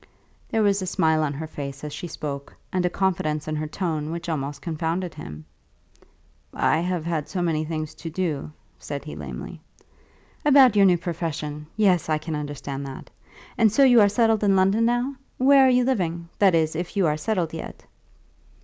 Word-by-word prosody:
There 225 -1 +1
was 200 -1 +2
a 185 - -3
smile 160 -4 +2
on 150 -2 0
her 155 +3 -5
face 140 -2 -7
as 150 -1 -5
she 165 +4 -6
spoke, 140 -3 -6 0.2
and 185 -1 +1
a 180 - +2
confidence 170 -6 -1
in 155 - -2
her 155 0 -3
tone 155 -3 -3
which 170 +1 -5
almost 145 -2 -3
confounded 165 +3 -3
him. 75 +1 -9 1.1
"I 155 - +2
have 175 -1 -2
had 165 -3 -2
so 185 - -3
many 160 -2 0
things 155 -1 -4
to 165 +1 -7
do," 160 -4 -3 0.3
said 140 -1 -6
he - - -7
lamely. 65 -5 -7 0.8
"About 270 -6 +6
your 200 -1 +6
new 180 -1 +4
profession. 155 -3 -4
Yes, 185 -6 +3
I 155 - +2
can 155 +1 -5
understand 145 -2 -5
that. 135 - -9 0.5
And 220 -2 +5
so 275 +6 +4
you 245 -4 +7
are 205 - +5
settled 225 0 +2
in 200 -1 +4
London 195 +4 +3
now? 245 +3 +1 0.2
Where 270 +1 +6
are - - +5
you 250 0 +4
living; 170 -9 -1
that 195 -4 +5
is, 160 -1 +1
if 175 +4 -4
you 195 - +3
are 150 -1 +2
settled 170 0 -1
yet?" 165 - -8
165 Hz, 190 wpm, -24 LUFS, 150-195 Hz, 1.1 s, you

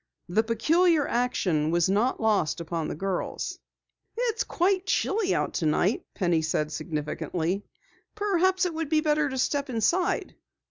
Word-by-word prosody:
The 185 +5 +2
peculiar 305 +8 +2
action 185 -11 0
was 170 0 +2
not 210 +7 +1
lost 210 -8 +1
upon 165 -1 -3
the - - -4
girls. 190 +3 -3 0.6
"It's 470 -1 0
quite 375 +1 0
chilly 395 0 +1
out - - -1
tonight," 175 +5 +1
Penny 175 -4 +1
said 155 -1 -1
significantly. 160 +4 -3 0.5
"Perhaps 375 -3 +2
it 355 - -2
would 320 -2 -3
be 310 -1 +3
better 300 -1 +2
to 265 - -4
step 280 +2 0
inside." 260 - 0
230 Hz, 140 wpm, -27 LUFS, -, 0.6 s, be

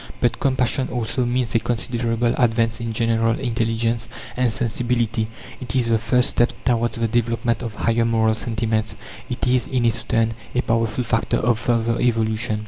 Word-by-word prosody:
But 120 - +1
compassion 130 -1 0
also 120 +1 -1
means 125 -1 -1
a 115 - +4
considerable 120 0 0
advance 115 -1 +1
in 115 -1 -3
general 115 0 +1
intelligence 115 -1 -1 0.3
and 125 -2 +1
sensibility. 120 -1 0 0.3
It 130 +1 -4
is 120 -3 +2
the 115 -1 +3
first 125 +3 +2
step 120 - +2
towards 120 -2 +1
the 115 0 +1
development 115 +1 0
of 115 -3 -5
higher 115 +1 +1
moral 110 -1 +2
sentiments. 110 -1 -1 0.3
It 125 - -2
is, 125 -1 +2
in 125 -3 0
its 115 -1 +1
turn, 115 -1 +1 0.2
a 125 - +3
powerful 115 0 0
factor 115 0 0
of 115 -1 +1
further 115 0 0
evolution. 110 -2 0
115 Hz, 165 wpm, -22 LUFS, 115-120 Hz, 0.3 s, a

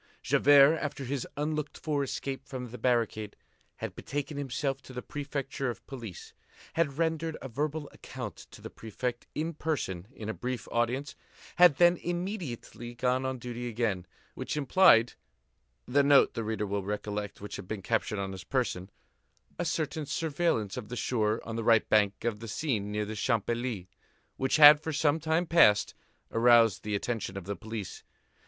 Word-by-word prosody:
Javert, 145 +2 +6
after 145 -2 -4
his 130 0 -3
unlooked 150 0 -2
for 150 -3 -1
escape 135 0 -4
from 125 -3 -6
the 125 - -8
barricade, 115 -4 0 0.4
had - - -5
betaken 145 +2 -4
himself 135 0 -2
to 130 - -12
the 125 - -6
prefecture 140 -2 -4
of 120 - -7
police, 115 -9 -9 0.4
had 150 -4 0
rendered 160 -1 -1
a - - -7
verbal 150 +4 -3
account - - -8
to - - -14
the - - -7
Prefect 120 +3 -5
in 160 +2 -2
person 120 - -3
in 110 -5 -8
a 110 - -2
brief 125 -1 -4
audience, 120 +4 -1 0.4
had 175 -5 +7
then 175 0 +5
immediately 175 - -5
gone 130 +2 0
on 130 0 -3
duty 120 0 -5
again, 110 -6 -1 0.3
which - - -4
implied—the 115 - +2
note, 140 0 +5
the 115 - -3
reader 110 -1 -2
will 100 0 -2
recollect, 105 0 -4
which 105 - -7
had 100 - -9
been 105 -2 -5
captured 110 -1 0
on 100 -1 -3
his 95 -1 -8
person—a 110 - -5
certain 155 -2 -2
surveillance 145 - -1
of 115 -5 -6
the 125 - -5
shore 110 -3 0
on 115 - -5
the 115 - -2
right 115 -1 +4
bank 105 -2 +2
of 110 -3 -1
the 115 - -8
Seine 125 +1 -1
near 105 0 -2
the 110 - -5
Champs 110 0 0
Élysées, 120 -5 -2 0.5
which 130 - +1
had, 150 -1 +10
for 160 +1 -4
some 150 +1 +2
time 160 +2 +1
past, 160 -12 +5 0.4
aroused 115 -3 +5
the 105 -1 -2
attention 100 -2 -3
of 95 - -5
the 100 +1 -3
police. 110 -3 -7
125 Hz, 170 wpm, -29 LUFS, 110-145 Hz, 0.5 s, had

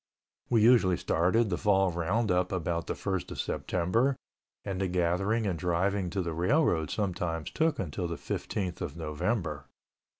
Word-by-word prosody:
We 115 -3 +4
usually 110 -7 +5
started 95 +7 +2
the 85 - -1
fall 95 -2 +3
roundup 90 +1 0
about 85 -3 -2
the - - -2
first 95 -3 -3
of - - -7
September 115 +10 0 0.5
and 95 -2 -3
the 95 - +1
gathering 90 +5 +1
and 90 -5 -1
driving 90 +3 0
to 95 +1 -2
the 85 -1 -3
railroad 85 - +2
sometimes 90 -6 -2
took 160 0 +1
until 90 0 -3
the 85 - -4
15th 90 0 -4
of 75 - -4
November. 80 - -2
90 Hz, 155 wpm, -29 LUFS, 85-105 Hz, 0.5 s, usually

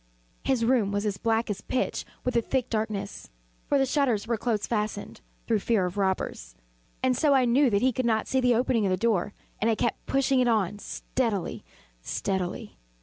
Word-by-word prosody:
His 255 -4 +1
room 230 -5 +2
was 205 +1 -1
as 200 -2 -2
black 225 0 +1
as 200 - -4
pitch 260 - -2 0.2
with 250 - -1
the 235 - +3
thick 255 +1 -1
darkness, 215 -2 -3 0.4
(for 285 - +3
the 270 - +3
shutters 260 -6 +1
were 235 +1 0
close 220 -2 -1
fastened, 210 -2 -3 0.2
through 225 -2 +2
fear 205 -2 +1
of 180 +1 -4
robbers,) 190 - -2 0.5
and 260 -1 +3
so 285 +2 +3
I 260 -2 +4
knew 255 +3 +4
that 200 0 +1
he 260 0 +3
could 255 - -1
not 220 -2 +1
see 265 - +1
the 250 -1 +4
opening 240 -1 +2
of - - +1
the 185 - +1
door, 205 -2 0 0.3
and 225 - +3
I 225 - +3
kept - - -2
pushing 270 -1 +2
it 250 - +3
on 210 -3 +1
steadily, 220 -4 -2 0.4
steadily. 185 - -3
225 Hz, 200 wpm, -27 LUFS, 205-255 Hz, 0.5 s, I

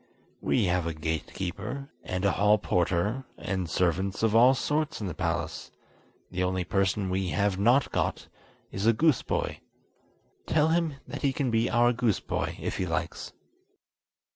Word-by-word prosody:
"We 115 - +2
have 90 -1 +1
a 80 - -3
gate 80 0 -3
keeper, 140 - -5
and 90 +1 -2
a 100 - +4
hall 105 +2 +4
porter, 95 +6 0
and 95 -3 -3
servants 95 +4 0
of 110 -1 +3
all 125 +3 +7
sorts 155 +4 -1
in 105 - -4
the 90 - -3
palace; 85 -1 -3 0.6
the 90 0 -2
only 90 0 0
person 95 +2 0
we 95 0 0
have 100 0 0
not 120 +6 +3
got - - -1 0.4
is 100 +3 -1
a 115 - +6
goose 155 +3 +3
boy. - - -2 0.9
Tell 155 0 +3
him 165 -3 +1
that - - -6
he 140 - +2
can 130 -2 -1
be 115 0 +2
our 120 0 +4
goose 115 -4 +1
boy - - -3
if - - -3
he - - -1
likes." - - -3
100 Hz, 165 wpm, -28 LUFS, 90-125 Hz, 0.9 s, all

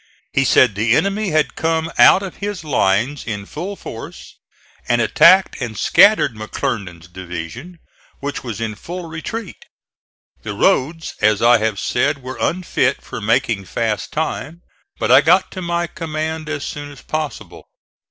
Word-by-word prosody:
He 135 - +2
said 120 -1 +5
the 110 +4 +2
enemy 200 +4 0
had 155 -2 +1
come 160 0 -1
out 195 - +7
of 190 - -7
his 205 -3 -5
lines 130 -1 +1
in 105 -3 -5
full 180 - -6
force - - -10 0.5
and - - +2
attacked 190 -6 +5
and 115 -4 -4
scattered 190 - +5
McClernand's 100 -5 -5
division, 90 - -8 0.4
which 140 0 -5
was 115 -4 -5
in 110 -1 -3
full 175 - -7
retreat. 175 +6 -6 0.8
The - - -6
roads, 160 +5 +1
as 110 0 +3
I 120 0 +6
have 110 -2 -1
said, 140 +2 0
were 130 +1 -7
unfit 165 -7 0
for - - -7
making 115 -2 0
fast 110 +2 -2
time, 160 +1 -4 0.3
but - - 0
I 130 +2 +8
got 175 +5 +3
to 185 - -6
my 170 0 -1
command 160 -1 -4
as 145 -2 -3
soon 145 -1 -6
as 140 - -14
possible. 155 -2 -5
145 Hz, 150 wpm, -19 LUFS, 110-165 Hz, 0.8 s, I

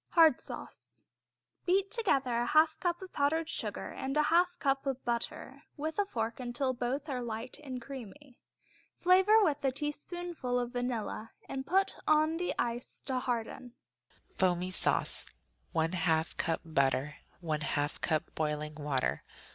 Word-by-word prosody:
Hard 325 -2 +6
Sauce - - -10 0.6
Beat 390 +2 +2
together 275 - +2
a 240 0 +1
half 310 +2 +4
cup 350 0 -1
of 370 - -10
powdered 310 +3 +1
sugar 335 - -4
and 270 +2 -3
a 300 - +5
half 355 +1 +4
cup 275 0 0
of 270 -1 -2
butter 235 -1 -3
with 315 +5 -3
a 405 - +2
fork 230 - -2
till 260 0 +1
both 255 +4 -2
are 260 -4 -2
light 230 +1 -5
and 260 -3 -5
creamy. 260 +1 -10 0.6
Flavor 380 +5 +6
with 295 -6 +1
a 270 - +3
teaspoonful 295 -1 -3
of 245 0 -2
vanilla 245 -3 -3
and 265 0 -4
put 385 +3 +2
on 310 +1 +4
the 355 +1 -1
ice 240 +1 -3
to 260 -2 -1
harden. 245 0 -3 0.6
Foamy 180 0 +1
Sauce - - +1 0.5
1/2 165 0 +1
cup 165 -1 0
butter. 140 -1 +1 0.3
1/2 150 -2 -1
cup 155 -3 0
boiling 150 -1 -1
water. 145 - -1
255 Hz, 145 wpm, -32 LUFS, 205-310 Hz, 0.6 s, Hard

